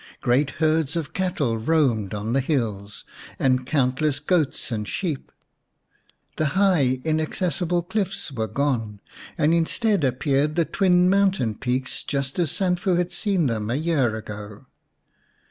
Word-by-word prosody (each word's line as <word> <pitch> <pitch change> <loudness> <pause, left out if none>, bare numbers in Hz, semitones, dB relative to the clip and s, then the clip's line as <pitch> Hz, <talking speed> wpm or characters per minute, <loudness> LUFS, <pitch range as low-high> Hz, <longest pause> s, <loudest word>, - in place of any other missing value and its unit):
Great 135 +4 +2
herds 155 -1 +1
of 165 -4 -3
cattle 150 - -1
roamed 120 -7 +1
on 105 +2 -3
the 135 - +3
hills, 110 -8 -2 0.3
and 130 -1 +1
countless 140 +1 +1
goats 150 -4 0
and 105 -2 -3
sheep. 165 -8 -3 1.1
The 155 - +1
high, 150 -11 +3
inaccessible 170 +2 0
cliffs 195 -2 -3
were 110 -4 -2
gone, 115 -3 -1 0.4
and 155 +2 +3
instead 190 +3 +1
appeared 140 +3 +1
the 170 - +2
twin 180 +2 +3
mountain 190 - +2
peaks 130 +3 -3
just 140 +1 -3
as 170 -4 +2
Sanfu 180 +1 +1
had 175 0 0
seen 195 -6 0
them 110 -4 -1
a 120 - 0
year 145 -7 +1
ago. 105 +1 -8
145 Hz, 135 wpm, -24 LUFS, 125-175 Hz, 1.1 s, the